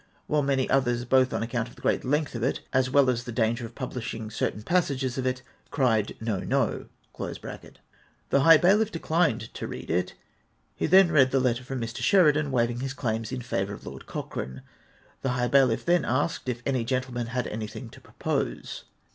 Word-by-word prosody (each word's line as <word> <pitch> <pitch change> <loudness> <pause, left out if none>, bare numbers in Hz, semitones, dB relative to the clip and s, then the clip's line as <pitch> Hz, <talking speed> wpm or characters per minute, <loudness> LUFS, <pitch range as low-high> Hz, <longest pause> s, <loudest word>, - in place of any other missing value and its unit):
'''' - - -36
while 150 0 +1
many 135 -2 +1
others, 120 -3 +1
both 130 +1 +3
on - - -1
account 115 0 -2
of - - -17
the - - -16
great - - +1
length 150 +3 0
of 120 - -4
it 130 - 0
as 130 -1 +2
well 140 0 +4
as 120 -1 +1
the 120 - -6
danger 115 +1 0
of 115 - -18
jaublishing 115 -4 -5
certain 105 -1 -2
passages 135 -6 0
of 130 -1 -1
it, 125 0 -2 0.3
cried 115 -7 +1
"No, 110 -4 -2
no!''''). - - -1 1.4
The 140 - +4
high 165 +3 +8
bailiff 205 +6 +3
declined 160 - 0
to - - -5
read - - -6
it. 90 +2 -1 0.6
He - - -1
then 185 +1 +6
read 135 -5 +5
the 135 - +2
letter 125 -1 0
from 130 +1 -5
Mr. 115 0 -5
Sheridan, 155 -6 +4
waiving 120 -2 0
his 135 +1 -4
claims 115 -3 -2
in 130 -2 -4
favour 100 -3 -2
of - - -14
Lord - - -9
Cochrane. 65 0 -6 0.6
The 130 -2 0
high 125 0 0
bailiff 130 -3 +3
then 175 0 +3
asked 130 +2 -1
if 120 -1 -4
any 130 -4 0
gentleman 125 -1 -2
had 125 0 -2
an3rthing 110 +2 -6
to - - -14
propose. - - -3
125 Hz, 195 wpm, -27 LUFS, 115-140 Hz, 1.4 s, high